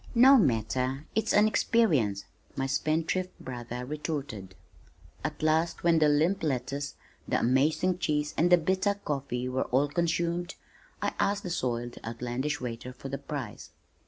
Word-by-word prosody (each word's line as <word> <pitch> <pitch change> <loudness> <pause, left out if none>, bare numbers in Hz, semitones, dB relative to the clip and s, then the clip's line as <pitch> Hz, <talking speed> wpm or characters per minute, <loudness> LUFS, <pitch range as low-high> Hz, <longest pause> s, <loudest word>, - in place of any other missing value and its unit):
"No 260 +4 +8
matter, 130 - +1
it's 220 - +1
an 210 +1 +5
experience," 150 - +2 0.3
my 135 - -1
spendthrift 160 +6 -1
brother 125 -1 -6
retorted. 140 - -5 0.7
At - - -4
last 160 +2 +1
when 170 -1 +4
the 155 -1 +5
limp 160 +7 +2
lettuce, 140 0 -2 0.3
the - - +1
amazing 155 +8 +2
cheese 150 -2 0
and 175 +3 +2
the 180 - +9
bitter 190 +4 +1
coffee 135 -9 -3
were 130 +1 -1
all 140 +3 +2
consumed, 170 +2 -1 0.5
I - - 0
asked 200 0 +1
the 180 - -4
soiled, 120 -6 -2
outlandish 125 +6 -3
waiter 125 +1 -6
the 135 0 -5
price. 140 -5 -6
145 Hz, 140 wpm, -29 LUFS, 125-170 Hz, 0.7 s, the